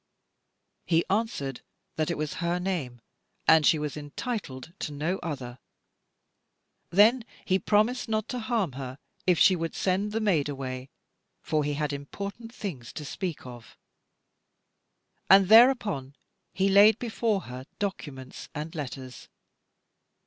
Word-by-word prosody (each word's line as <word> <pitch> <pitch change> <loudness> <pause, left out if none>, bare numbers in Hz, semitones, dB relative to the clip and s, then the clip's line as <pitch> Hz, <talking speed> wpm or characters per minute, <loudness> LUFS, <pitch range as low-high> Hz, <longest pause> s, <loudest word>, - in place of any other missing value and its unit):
He 165 -1 +3
answered 195 - -1 0.3
that 155 -1 0
it 170 - -1
was 150 0 -3
her 170 +1 0
name, 160 -11 -3 0.5
and 160 -1 +7
she 160 - +5
was 150 -1 -3
entitled 150 - -5
to 150 - -4
no 155 +6 -2
other. 130 -6 -6 1.3
Then 220 +7 +5 0.2
he 190 0 +2
promised 220 +6 +1
not 215 -1 0
to 250 - -3
harm 220 - 0
her, 130 0 -7 0.3
if 180 -2 +4
she 185 - +6
would 165 -1 -4
send 195 +3 0
the 220 - -1
maid 175 -10 +1
away, 130 -1 -5 0.5
for 155 -1 0
he 145 0 -1
had 150 0 -1
important 200 +10 -6
things 160 - -6
to 150 - -6
speak 175 0 -5
of. 120 -3 -11 1.5
And 195 0 +7
thereupon 220 - +5 0.4
he 195 0 +1
laid 200 +2 +7
before 225 -4 -1
her 130 -2 -9
documents 145 -10 -5
and 150 +2 -5
letters. 130 -4 -7
165 Hz, 135 wpm, -27 LUFS, 140-205 Hz, 1.5 s, and